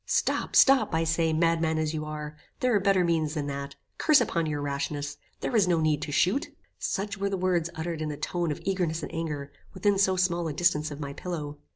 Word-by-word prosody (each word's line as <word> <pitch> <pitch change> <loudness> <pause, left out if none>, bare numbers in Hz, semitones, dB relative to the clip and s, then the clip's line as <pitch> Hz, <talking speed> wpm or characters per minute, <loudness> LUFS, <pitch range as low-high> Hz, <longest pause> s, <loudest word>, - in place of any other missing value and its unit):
"Stop, - - 0
stop, 270 - +6
I 165 - +2
say; 160 0 +1
madman 160 0 +2
as 155 0 -1
you 155 -1 -3
are! 150 0 -6 0.2
there 250 -1 +2
are 205 - +4
better 195 -1 +3
means 165 -2 0
than 150 -2 -2
that. 140 0 -5 0.2
Curse 305 -2 +6
upon 170 -9 0
your 150 -1 -2
rashness! 145 0 -3 0.2
There 250 - -2
is 205 -5 +4
no 170 -2 +3
need 155 -2 +1
to 150 - -4
shoot." 185 - +2 0.3
Such 200 +1 -3
were 200 0 0
the 195 - -1
words 180 -2 +1
uttered 160 0 -4
in 155 - -2
a 145 - -5
tone 170 +2 -1
of 150 - -5
eagerness 175 -4 -1
and - - -6
anger, 150 -4 -4 0.2
within 195 +1 +2
so 190 -1 +3
small 175 -2 +1
a 155 - -3
distance 155 -2 +2
of 145 -1 -8
my 140 -2 -5
pillow. 150 -4 -5
165 Hz, 225 wpm, -27 LUFS, 150-185 Hz, 0.3 s, stop